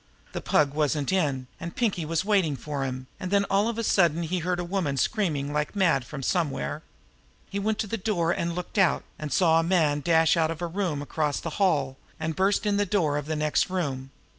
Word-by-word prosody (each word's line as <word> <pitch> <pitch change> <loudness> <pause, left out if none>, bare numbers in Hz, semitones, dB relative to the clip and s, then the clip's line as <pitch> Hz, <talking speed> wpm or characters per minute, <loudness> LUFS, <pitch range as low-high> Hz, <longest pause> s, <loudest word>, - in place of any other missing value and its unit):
The - - -4
Pug 145 -2 +2
wasn't 150 -1 0
in, 140 -8 0
and 170 - -6
Pinkie 200 -9 0
was 165 +3 -1
waiting 190 -8 +2
for 140 +2 -4
him, 130 0 -4
and 185 - -4
then 200 +1 +3
all 200 +2 +3
of 230 -1 -2
a 230 - -1
sudden 170 -5 +3
he 180 +3 -1
heard 175 +1 -1
a - - -1
woman 170 -7 -1
screaming 150 - 0
like 150 +5 -1
mad 170 -10 +2
from 140 0 -7
somewhere. 165 -1 -1 0.7
He 200 - -2
went 215 +1 0
to 220 - -1
the 225 +2 -3
door 180 -5 0
and 170 -1 -1
looked 180 +3 -3
out, 185 -4 +3 0.2
and 150 -1 -5
saw 165 -3 +4
a - - +1
man 165 -4 +2
dash 160 0 +4
out 160 -2 +2
of 165 -1 -4
a 175 - -2
room 170 -5 -2
across 150 0 -1
the 165 - -5
hall, 140 -8 +2 0.2
and 160 0 -2
burst 195 +3 +2
in 205 -1 +2
the 205 - +2
door 170 -7 +1
of 145 0 -3
the 155 - -1
next 150 +2 +1
room. 140 -8 -3
165 Hz, 225 wpm, -26 LUFS, 150-190 Hz, 0.7 s, saw